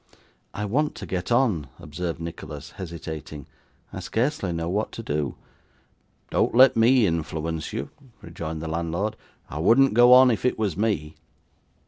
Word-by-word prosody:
'I 105 - -3
want 145 +9 0
to - - -7
get 90 +4 -4
on,' 110 - +2
observed 85 +3 -5
Nicholas, 75 -3 -8
hesitating. 80 -5 -7 0.5
'I - - -5
scarcely 120 - -1
know 85 0 -3
what 105 +5 -1
to 115 - -7
do.' 75 - -2 1.0
'Don't - - +1
let 130 +1 +7
me 115 +1 +5
influence 80 -2 -3
you,' 70 - -5 0.3
rejoined 80 -2 -6
the - - -4
landlord. 85 +6 -2 0.4
'I 75 - -5
wouldn't 115 +10 +4
go 120 +2 +6
on 130 0 +8
if 110 - -2
it 125 - +1
was 105 -7 -1
me. 90 -8 -1
85 Hz, 150 wpm, -25 LUFS, 80-115 Hz, 1.0 s, on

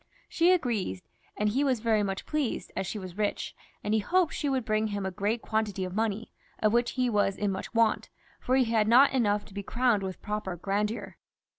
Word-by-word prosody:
She 345 +2 +3
agreed, 225 - 0 0.3
and 210 0 +2
he 260 +7 +1
was 260 -4 +1
very 220 -1 +2
much 195 -2 -3
pleased, 300 -6 -2
as 190 -1 -2
she 210 - -4
was 185 0 -8
rich, 205 -1 -1 0.3
and 210 - 0
he 220 - +4
hoped 350 - +2
she 290 - -1
would 260 -3 0
bring 215 -1 +1
him 205 -2 -3
a 190 - -2
great 210 +5 -1
quantity 215 -3 -1
of 180 - -6
money, 220 +1 -1 0.3
of 215 0 +2
which 240 0 +2
he 255 -1 +1
was 205 -4 +1
in 205 -1 0
much 190 - -5
want, 230 -1 +2 0.3
for 255 - +1
he 265 - +5
had 225 -2 +2
not 255 +5 +6
enough 210 -5 +1
to 200 - -15
be 200 - -4
crowned 235 0 +1
with 190 -1 -5
proper 210 -4 -3
grandeur. 205 +5 -2
215 Hz, 215 wpm, -28 LUFS, 200-240 Hz, 0.3 s, not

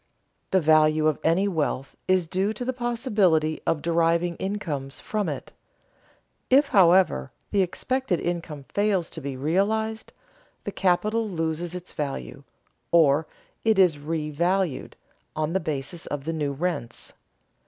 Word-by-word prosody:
The 190 - +3
value 155 -1 +4
of 155 -2 +2
any 175 +5 +3
wealth 150 -7 -2
is 185 -2 +3
due 190 +5 0
to 245 +3 -5
the 260 - -1
possibility 210 - +1
of 155 - 0
deriving 170 +1 +2
incomes 155 -9 -4
from 210 -5 -2
it. 140 -4 -6 1.0
If, 280 +2 +5
however, 180 - +4 0.2
the 200 - +3
expected 210 +2 -1
income 165 -4 -4
fails 200 -4 0
to 160 - -7
be 135 -2 -5
realized, 215 +9 0 0.5
the - - -4
capital 215 +4 +1
loses 165 0 -2
its 180 0 -8
value, 135 - -5 0.5
or 155 -2 +4 0.4
it 220 -2 +3
is 180 -6 +5
revalued 160 +2 -1 0.4
on 155 +1 -1
the 190 - +2
basis 155 +1 -5
of 145 -2 -4
the 165 - -2
new 150 -3 -1
rents. 145 -5 -4
170 Hz, 135 wpm, -25 LUFS, 155-195 Hz, 1.0 s, If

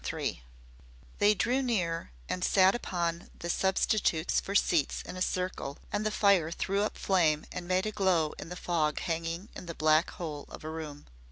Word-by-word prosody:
III - - -3 0.8
They 205 +1 +5
drew 250 +7 +1
near 180 - -1 0.2
and 180 - -2
sat 190 0 +5
upon 170 -7 -2
the 170 - -2
substitutes 190 -3 +2
for 200 - -5
seats 170 -7 +2
in - - -8
a 185 - -6
circle 180 -7 -2 0.2
and 205 +1 0
the 215 - +1
fire 200 -6 +3
threw 195 +4 -1
up 210 - -1
flame 160 -6 +2
and 180 -1 -6
made 185 +2 +1
a 215 - -1
glow 185 -7 +2
in - - -7
the 180 - -5
fog 160 -4 0
hanging 165 +4 -3
in 180 - -8
the 170 - -5
black 155 +2 +3
hole 155 -6 -6
of - - -10
a 155 - -5
room. 155 -3 -7
180 Hz, 185 wpm, -30 LUFS, 160-195 Hz, 0.8 s, They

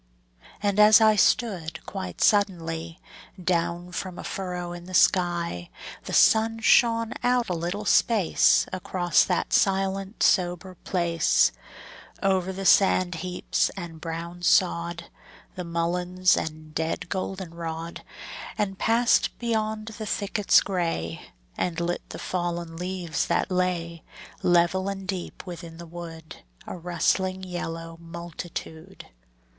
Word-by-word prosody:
And 205 0 +1
as 210 +1 +8
I 220 -1 +5
stood, 190 -7 +1
quite 90 -1 -6
suddenly, 165 -5 +1 0.4
Down 175 0 -1
from 180 0 -5
a - - -7
furrow 180 -2 -4
in 175 0 -9
the 185 0 -6
sky 170 - +2 0.4
The - - -6
sun 225 0 +4
shone 230 0 +4
out 245 -2 +1
a - - 0
little 175 +5 -3
space 205 -4 +4
Across 180 -2 +2
that - - -1
silent 195 +1 +1
sober 180 0 +2
place, 170 -3 +2 0.7
Over 190 -1 +1
the 195 +1 -6
sand 185 0 +4
heaps 180 -1 0
and 165 -4 -7
brown 170 +1 -6
sod, 170 -1 +1 0.4
The 185 - -5
mulleins 180 +2 +1
and 155 -1 -5
dead 160 +1 -2
goldenrod, 170 -4 -5 0.6
And 195 -3 -2
passed 230 +1 +2
beyond 220 -2 -2
the 215 - -4
thickets 205 0 +3
gray, 165 - -3 0.3
And 175 -2 -2
lit 175 +1 -1
the - - -7
fallen 175 -2 -3
leaves 180 -1 -3
that 170 +2 0
lay, 175 -2 -1 0.4
Level 175 +2 +2
and 195 -1 -6
deep 185 -1 -5
within 170 -2 -8
the 170 - -9
wood, 165 -1 -9 0.3
A - - -6
rustling 185 +2 0
yellow 165 -2 -6
multitude. 170 +1 -8
180 Hz, 120 wpm, -26 LUFS, 170-195 Hz, 0.7 s, as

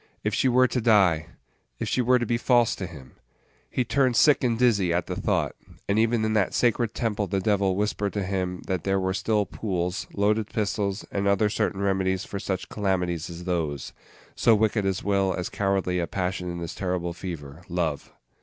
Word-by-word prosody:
If - - -1
she 130 - +2
were 130 +1 +5
to 125 - -1
die! 95 -9 +4 0.5
If - - -3
she 125 - +1
were 125 +1 +4
to 120 - -1
be 120 +1 0
false 120 -2 +3
to 95 - -5
him! 70 -7 -13 0.5
He 130 - 0
turned 130 -1 +2
sick 145 +4 +5
and 120 -2 +1
dizzy 105 -8 +3
at 85 +1 0
the - - -4
thought; - - 0 0.3
and 100 +2 +2
even 115 0 +2
in 110 - 0
that 105 -3 +1
sacred 120 -2 +1
temple 105 -3 -1
the 95 0 0
Devil 100 -1 +1
whispered 105 0 -1
to 105 - -1
him 90 -1 -2
that 95 -3 -2
there 95 0 +1
were 95 0 0
still 105 +1 +1
pools, 90 -3 -3
loaded 105 +1 +1
pistols, 100 -1 -2
and 100 0 -1
other 100 +1 +3
certain 100 -1 -1
remedies 95 -1 0
for 100 - -5
such 95 -1 -3
calamities 90 -5 -1
as 85 0 -8
those, 80 -6 -2 0.4
so 115 -2 +4
wicked 105 -1 +1
as 95 -1 -1
well 100 -2 +1
as 90 - -3
cowardly 95 -2 0
a 85 - -1
passion 90 -1 -2
is - - -5
this 85 - -5
terrible 90 -2 -2
fever, 85 -4 -7
Love! 85 -5 -2
100 Hz, 200 wpm, -26 LUFS, 90-110 Hz, 0.5 s, were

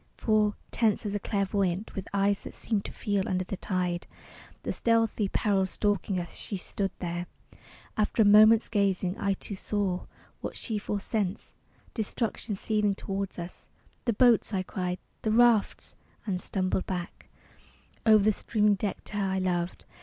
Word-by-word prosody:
For, 215 -2 +2 0.2
tense 220 -1 +1
as 205 - -2
a 205 - 0
clairvoyant, 195 -1 -1
With 195 - -5
eyes 200 0 +2
that - - -10
seemed 215 -3 -2
to - - -5
feel 200 -2 -1
under 185 0 0
the 195 - -4
tide 180 -2 -2 0.6
The - - -2
stealthy 225 -3 +2
peril 195 -3 +1
stalking 205 -1 0
us, 175 - -6
she 200 - -4
stood 195 +1 -2
there. 175 0 -3 0.7
After 215 +1 +2
a - - +3
moment's 215 +2 +7
gazing, 195 -3 +1
I 200 -2 +1
too 200 - -6
saw 195 -2 -2 0.3
What - - -5
she 220 -3 -2
foresensed 205 -1 -2 0.4
destruction 220 -1 -2
seething 210 0 +1
toward 195 0 -4
us. 170 +1 -8 0.4
"The 235 - +2
boats!" 230 -2 +4
I 185 - 0
cried, 180 -1 -3 0.2
"the 220 - -1
rafts!" 230 -1 +3 0.3
And 185 -4 -2
stumbled 185 -1 -1
back 180 -2 -5 0.7
Over 215 -2 +6
the 215 - +5
streaming 210 0 +2
deck 200 0 -3
to 210 - -4
her 195 -2 0
I - - 0
loved. 180 -2 -1
200 Hz, 160 wpm, -28 LUFS, 185-215 Hz, 0.7 s, moment's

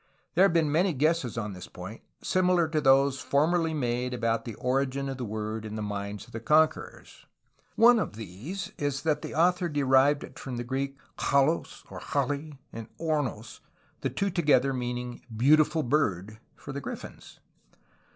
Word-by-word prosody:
There 185 +3 +6
have 195 - +3
been 160 -3 +2
many 175 +4 +2
guesses 150 -4 0
on 105 -3 -3
this 90 -1 -9
point 95 +5 -9 0.2
similar 180 -2 +2
to 155 -1 0
those 135 0 +4
formerly 160 +3 +1
made 125 -2 -1
about 115 -1 -1
the 115 -3 -6
origin 135 +2 -1
of 135 - -4
the 125 - -4
word 110 +1 -4
in 110 -1 -6
the 110 - -3
minds 100 0 -5
of - - -18
the 115 - -4
conquerors. 155 +7 0 0.5
One 235 +1 +6
of 105 - -3
these 115 - -7
is 145 -2 -2
that 155 -2 +1
the - - -6
author 175 +2 +2
derived 140 0 +3
it - - -11
from 130 -2 -6
the 120 - -3
Greek 135 +2 -3 0.2
xaXXoj, 140 +4 0
or - - -7
xaXXt, 145 +1 -2 0.2
and 115 -1 -7
opvta, 145 -9 -2 0.4
the - - -1
two 200 0 -1
together 140 -6 +3
meaning 125 -1 -4
''beautiful 150 +5 +3
bird" 110 - 0
— - - -39
for 145 - -9
the 140 - -4
grifiins! - - -9
135 Hz, 170 wpm, -28 LUFS, 115-155 Hz, 0.5 s, There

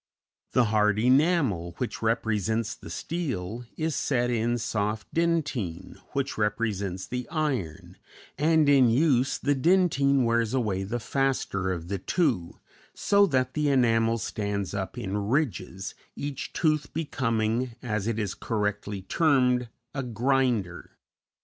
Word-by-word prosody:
The 125 - +5
hard 105 -1 +3
enamel, 125 - +2
which 125 - -4
represents 110 -1 0
the - - -11
steel, 120 - -4
is 160 -1 -1
set 120 -3 0
in 120 +1 +1
soft 105 -1 -2
dentine, 150 - -1
which 140 -4 -2
represents 100 -3 -1
the 125 +3 -5
iron, 130 - -3 0.4
and 155 0 +3
in 135 -4 +6
use 130 +1 +2
the 145 - +1
dentine 140 -3 +3
wears 115 0 +1
away 100 -6 0
the 120 +5 -3
faster 120 -8 -1
of 85 -2 -4
the 100 +1 -3
two, 95 - 0 0.4
so 200 0 +4
that 130 -4 0
the 150 -1 +1
enamel 115 -3 +3
stands 100 -3 -3
up 95 -1 -4
in 100 +1 -2
ridges, 100 - -1 0.2
each 145 -1 -5
tooth 155 -3 0
becoming, 120 -5 -1
as 105 -3 -2
it 115 -1 -1
is 105 -3 -2
correctly 105 -2 -3
termed, 125 - +2 0.2
"a 140 - -2
grinder." 120 -6 -1
120 Hz, 130 wpm, -27 LUFS, 105-140 Hz, 0.4 s, in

